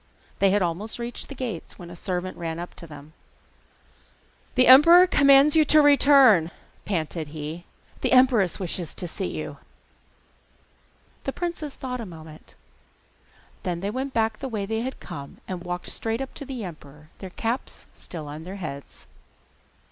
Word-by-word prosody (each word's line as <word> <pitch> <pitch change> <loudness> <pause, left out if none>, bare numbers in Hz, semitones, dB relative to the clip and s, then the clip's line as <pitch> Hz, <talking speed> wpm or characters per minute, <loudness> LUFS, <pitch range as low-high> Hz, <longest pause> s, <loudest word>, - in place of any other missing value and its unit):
They 195 - +4
had 200 0 +2
almost 180 +6 -3
reached 240 0 -6
the 280 - -8
gates 235 -10 -6
when 175 -1 -10
a - - -9
servant 180 +1 -4
ran 165 -1 -4
up 175 +1 -7
to 170 - -8
them. 150 0 -12 1.4
'The 255 0 +5
emperor 335 +8 +9
commands 280 -3 +5
you 315 - +6
to 305 +1 +5
return,' 275 - +6 0.4
panted 165 -4 -2
he: 155 +3 -7 0.4
'the - - 0
empress 250 - +4
wishes 175 -3 -4
to 180 - -5
see 185 +2 -4
you.' - - -6 1.7
The 270 - -1
princes 340 -5 -4
thought 250 -2 -5
a 220 - -7
moment: 160 -2 -13 1.1
then 175 -3 -3
they 200 +2 -2
went 265 +4 -3
back 220 -3 0
the 270 - -5
way 210 -4 -3
they 220 +2 -2
had 260 +2 -5
come, 140 0 -9
and 180 -2 -5
walked 180 0 -5
straight 225 +1 -3
up 270 0 -6
to 285 - -7
the 255 -4 -6
emperor, 150 -4 -11
their 190 - -7
caps 230 +7 -4
still 160 -4 -9
on 150 +2 -8
their 185 +3 -7
heads. 140 -7 -8
195 Hz, 165 wpm, -25 LUFS, 170-260 Hz, 1.7 s, emperor